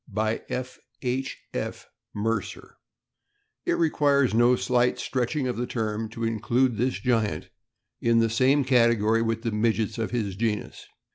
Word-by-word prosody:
BY 110 +2 -1
F. 125 0 -4 0.2
H. 130 +1 -2 0.2
F. - - -4 0.3
MERCER. 105 0 -3 0.9
IT - - +3
requires 145 -6 +2
no 120 +2 +5
slight 125 0 +1
stretching 130 +2 -1
of 125 - -2
the 120 +1 -2
term 110 -1 -2
to 115 +1 -6
include 115 +2 +1
this 125 +3 0
giant 115 -5 0 0.5
in 115 0 +3
the 115 0 +4
same 130 +5 +3
category 115 -3 +3
with 115 0 -1
the 115 - -1
midgets 110 +1 0
of 110 - -1
his 105 -6 -2
genus. 105 0 -3
115 Hz, 145 wpm, -26 LUFS, 110-125 Hz, 0.9 s, no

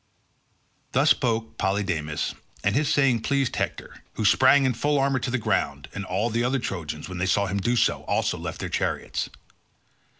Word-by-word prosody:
Thus 140 +4 +4
spoke 115 -4 0
Polydamas 95 -7 -1 0.3
and 100 - +2
his 145 0 +2
saying 135 -5 +3
pleased 140 0 0
Hector, - - -4
who 110 - -2
sprang 130 +6 +5
in 130 - +2
full 145 +5 +1
armour 135 -1 +2
to 125 - -3
the 130 - 0
ground, 70 -9 -1
and 100 - -5
all 100 +6 -1
the 115 +2 0
other 130 +2 +1
Trojans, 85 - -4
when 90 -1 -6
they 90 - 0
saw 100 +2 +2
him 100 +1 -2
do 120 +5 +1
so, 115 - +2
also - - 0
left - - -5
their - - -2
chariots. - - -2
115 Hz, 180 wpm, -25 LUFS, 95-130 Hz, 0.3 s, sprang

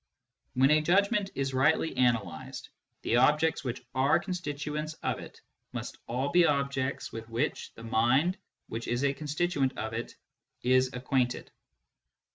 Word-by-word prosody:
When 135 +3 +5
a 155 0 +5
judgment 200 +5 +2
is 135 0 -1
rightly 150 +5 +2
analysed, 110 - -1 0.3
the 120 - +2
objects 150 +3 +3
which 125 -1 -4
are 135 +2 +3
con 190 - -4
stituents 150 -2 -4
of - - -1
it - - -11 0.3
must - - -6
all 130 +4 -1
be 175 +4 +5
objects 140 -3 0
with 115 0 -7
which 120 +6 -2
the 115 - -11
mind 120 +10 +2 0.3
which 115 +1 -5
is 120 +3 0
a 140 -1 +2
constituent 150 -2 -1
of 110 0 -3
it 115 +1 -5 0.5
is 130 +1 +3
acquainted. 125 0 -1
135 Hz, 145 wpm, -29 LUFS, 125-150 Hz, 0.5 s, When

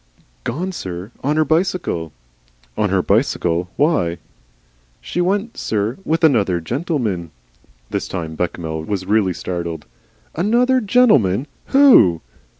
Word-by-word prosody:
"Gone, 180 +9 -3
sir. 95 - -6
On 145 +2 +1
her 155 0 +3
bicycle." 160 - -1 0.6
"On 105 - 0
her 95 -1 +1
bicycle! 90 -6 +1
Why?" 115 - +1 0.8
"She 175 - -3
went, 200 +5 -1
sir, 110 - -2
with 165 0 -1
Another 105 - +3
Gentleman." 115 - -2 0.6
This - - -2
time 80 -4 -5
Bechamel 80 -1 -3
was 95 0 -3
really 100 -2 +2
startled. 85 -1 -5 0.5
"An 205 +8 0
other 255 +1 +3
Gentlemen! 195 - +3 0.2
WHO?" 265 - +6
110 Hz, 120 wpm, -19 LUFS, -, 0.8 s, WHO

